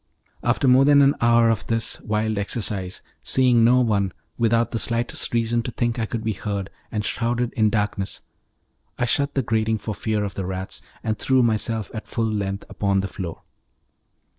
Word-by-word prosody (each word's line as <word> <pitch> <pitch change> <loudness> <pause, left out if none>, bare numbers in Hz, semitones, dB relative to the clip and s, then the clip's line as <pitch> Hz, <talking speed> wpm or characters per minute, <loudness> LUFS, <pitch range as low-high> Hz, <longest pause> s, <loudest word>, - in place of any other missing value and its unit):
After 120 +3 +1
more 130 +1 +6
than 145 0 +6
an 140 +1 +5
hour 115 0 +5
of 110 - -2
this 115 0 -2
wild 110 0 -1
exercise, 100 -3 -3 0.2
seeing 125 -3 +4
no 125 +2 +5
one, 100 -6 +1 0.2
without 115 0 +2
the 115 - -1
slightest 120 +1 -1
reason 115 0 +1
to 120 - -4
think 120 0 -1
I 110 - -1
could 115 0 -4
be 110 - 0
heard, 100 -1 -4 0.2
and 105 -2 -2
shrouded 120 +2 -1
in 110 -3 +3
darkness, 105 -2 -2 0.8
I 125 - +1
shut 140 +3 0
the 135 - +1
grating 110 0 +1
for 105 +1 -5
fear 105 0 -1
of 100 -2 -3
the 95 -1 -4
rats, 95 0 -3 0.2
and 110 -1 -2
threw 130 -1 +3
myself 110 -1 0
at 110 - -6
full 115 - -1
length 100 -2 -2
upon 100 -1 0
the 100 - -3
floor. 90 -4 -7
110 Hz, 185 wpm, -23 LUFS, 105-120 Hz, 0.8 s, more